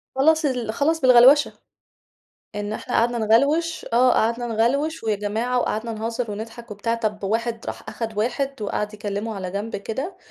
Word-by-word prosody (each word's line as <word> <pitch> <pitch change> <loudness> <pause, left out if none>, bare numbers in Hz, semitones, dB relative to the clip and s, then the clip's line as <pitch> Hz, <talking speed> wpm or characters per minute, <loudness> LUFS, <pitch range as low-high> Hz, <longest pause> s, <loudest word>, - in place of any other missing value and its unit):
خلّص 315 +3 +3
ال 245 -5 -1
خلّص 320 +5 +1
بالغلوشة. 255 +3 +6 1.0
إن 205 0 -3
إحنا 245 - -5
قعدنا 235 +1 +2
نغلوش 285 +10 +2
آه، 250 +2 +5
قعدنا 235 +2 +1
نغلوش 250 +6 0
ويا 215 -2 +1
جماعة 220 +5 -1
وقعدنا 230 -1 -2
نهزر 225 +1 -3
ونضحك 225 +2 -8
وبتاع، 220 +3 -2
طَب 215 -3 -3
واحد 225 +3 -2
راح - - -7
آخد 225 -2 -5
واحد 255 +3 -1
وقعد 210 +1 -2
يكلمه 205 +1 -4
على 190 -2 -5
جنب 205 +4 -4
كده، 265 - -5
230 Hz, 155 wpm, -23 LUFS, 215-255 Hz, 1.0 s, بالغلوشة